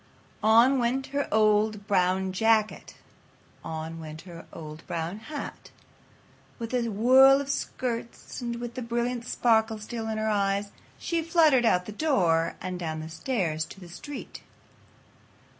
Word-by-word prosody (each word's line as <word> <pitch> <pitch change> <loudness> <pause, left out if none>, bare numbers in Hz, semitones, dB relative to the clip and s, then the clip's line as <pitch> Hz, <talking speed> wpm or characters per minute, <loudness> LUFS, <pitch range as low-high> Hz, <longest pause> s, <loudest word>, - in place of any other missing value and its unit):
On 230 +5 +5
went 250 +3 0
her 285 0 0
old 215 -1 +2
brown 190 -1 +1
jacket; 220 +1 +1 0.7
on 160 +1 -5
went 155 0 -8
her 170 -3 -11
old 155 -1 -9
brown 170 +4 -3
hat. 290 +7 -7 0.9
With 230 +1 -6
a 245 -2 +1
whirl 260 +6 +6
of 280 0 -2
skirts 235 -2 -4
and 235 -1 -3
with 240 0 -6
the 255 - -5
brilliant 235 0 -2
sparkle 225 -2 +2
still 220 +1 -6
in 220 -1 -2
her 215 0 -1
eyes, 200 -1 0 0.3
she 335 -1 -1
fluttered 315 -6 +4
out 180 -5 +3
the 210 - -7
door 185 - +1
and 185 -1 -5
down 160 -2 -3
the 155 +1 -7
stairs 165 -2 -2
to 180 - -12
the 180 -2 -12
street. 290 - -8
220 Hz, 145 wpm, -27 LUFS, 180-240 Hz, 0.9 s, whirl